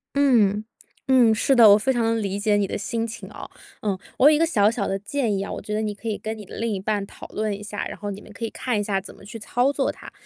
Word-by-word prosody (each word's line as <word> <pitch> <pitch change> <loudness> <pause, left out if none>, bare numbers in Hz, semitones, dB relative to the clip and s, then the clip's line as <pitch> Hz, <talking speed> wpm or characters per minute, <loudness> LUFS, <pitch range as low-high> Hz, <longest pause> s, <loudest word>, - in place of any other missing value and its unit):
嗯， 225 -8 +3 0.4
嗯， 250 -4 +5
是 265 +5 +2
的， 225 -4 +8
我 - - +9
非 265 +5 +1
常 230 -2 +1
理 200 -1 -2
解 210 0 +2
你 205 -1 +1
的 - - -3
心 225 +3 -2
情 230 - -8
啊。 - - -10 0.3
呃， 200 -3 -1 0.2
我 285 - +7
有 305 - +5
一 - - +2
个 330 - +3
小 210 -11 +3
小 215 -3 -2
的 195 0 -2
建 225 0 -1
议 195 - -2
啊， - - -6
我 - - -4
觉 210 +1 -6
得 215 - 0
你 210 -1 -3
可 230 - -9
以 210 -2 -2
跟 220 +1 -5
你 210 - -9
的 - - -11
另 230 0 -1
一 200 - -2
半 205 +1 -1
讨 - - -12
论 215 0 -2
一 205 0 -5
下， 205 0 -4
然 - - -8
后 205 -1 -5
你 200 +1 -8
们 215 - -14
可 230 +3 -5
以 225 - -3
看 245 -5 -2
一 - - -1
下 195 -2 -1
怎 - - -12
么 - - -16
去 225 +3 -8
操 245 +5 +1
作 275 -1 0
它。 - - -12
215 Hz, 330 characters per minute, -23 LUFS, 205-235 Hz, 0.4 s, 我